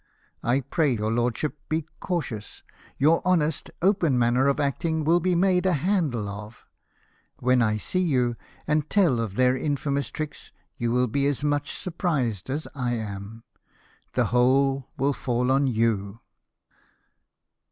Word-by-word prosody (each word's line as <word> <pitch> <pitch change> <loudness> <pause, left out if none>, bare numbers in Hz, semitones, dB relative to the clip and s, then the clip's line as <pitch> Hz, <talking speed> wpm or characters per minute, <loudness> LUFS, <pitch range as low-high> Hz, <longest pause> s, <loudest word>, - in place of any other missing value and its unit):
I 125 +4 +1
pray 140 0 +1
your 110 0 -1
lordship 120 +6 -1
be 155 0 -1
cautious; 130 - -4 0.3
your 155 +4 +4
honest, 165 -4 +1
open 180 -9 +3
manner 120 +3 +3
of 140 +1 +1
acting 160 +3 0
will 165 +3 +4
be 180 +1 +1
made 185 +1 +3
a 185 - +3
handle 150 - 0
of 105 +2 -9 0.7
When 125 0 +2
I 110 -2 +2
see 185 - -1
you, 125 -8 +1 0.3
and 150 0 0
tell 175 - +3
of 110 -4 -3
their 125 +1 +3
infamous 140 0 -1
tricks, 155 -1 -6 0.2
you 120 -1 -1
will 125 +1 +3
be 140 +4 0
as 145 0 -1
much 145 0 -1
surprised 145 - -2
as 145 +4 -3
I 125 -4 -1
am. 105 0 -6 0.7
The - - +2
whole 135 +2 +3
will 140 +1 +1
fall 125 0 0
on 135 +1 +3
you." 110 -3 0
135 Hz, 145 wpm, -25 LUFS, 120-155 Hz, 0.7 s, your